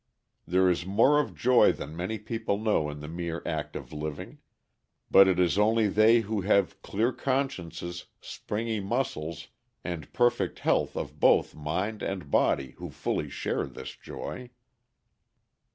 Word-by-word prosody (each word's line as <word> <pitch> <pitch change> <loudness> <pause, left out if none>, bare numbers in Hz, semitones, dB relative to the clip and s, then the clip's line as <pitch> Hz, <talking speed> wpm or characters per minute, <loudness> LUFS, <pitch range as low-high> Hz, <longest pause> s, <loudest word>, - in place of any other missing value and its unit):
There 95 +1 +3
is 90 -1 +1
more 105 +11 +4
of 150 - -2
joy 125 0 +5
than 75 - -8
many 90 +6 -3
people 105 -1 -2
know 105 -8 +1
in 75 0 -7
the 75 - -7
mere 85 +1 -4
act - - -3
of - - -7
living; 75 0 -6 0.7
but 95 0 +8
it 95 - +2
is 90 +2 +2
only 110 +1 +3
they 110 +3 +5
who 110 -1 -2
have 100 -1 +1
clear 115 +5 0
consciences, 90 - -3
springy 110 +1 -4
muscles, 95 - -3 0.3
and 85 -5 -5
perfect 120 -6 +1
health - - +1
of - - -5
both - - +4
mind 90 +9 -3
and 90 -8 -4
body 65 -2 +2
who - - -6
fully - - -3
share - - -2
this - - -9
joy. 125 -1 -7
95 Hz, 150 wpm, -28 LUFS, 85-110 Hz, 0.7 s, but